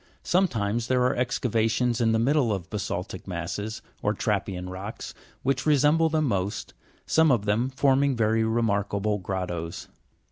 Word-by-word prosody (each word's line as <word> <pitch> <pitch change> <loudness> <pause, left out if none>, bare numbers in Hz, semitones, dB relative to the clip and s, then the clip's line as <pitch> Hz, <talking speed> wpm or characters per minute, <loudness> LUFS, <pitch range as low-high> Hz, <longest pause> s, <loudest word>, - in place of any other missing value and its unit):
Sometimes 120 - +1
there 125 -1 +2
are 125 - +2
excavations 120 -1 0
in 115 -1 +3
the 110 - +3
middle 130 +1 +2
of 95 -3 -4
ba 105 - -2
sa'ltic 95 -1 -5
masses, 95 +5 -4 0.2
or - - 0
trappean 90 -1 -2
rocks, 95 +4 -7 0.3
which 135 +2 0
resemble 150 +2 +4
them 155 -1 +1
most, 100 -4 -2 0.3
some 160 -2 +4
of 110 -5 +1
them 110 +5 +1
forming 135 0 +2
very 110 0 +2
remarkable 105 -2 0
grottoes. 90 -3 -4
115 Hz, 145 wpm, -26 LUFS, 100-130 Hz, 0.3 s, resemble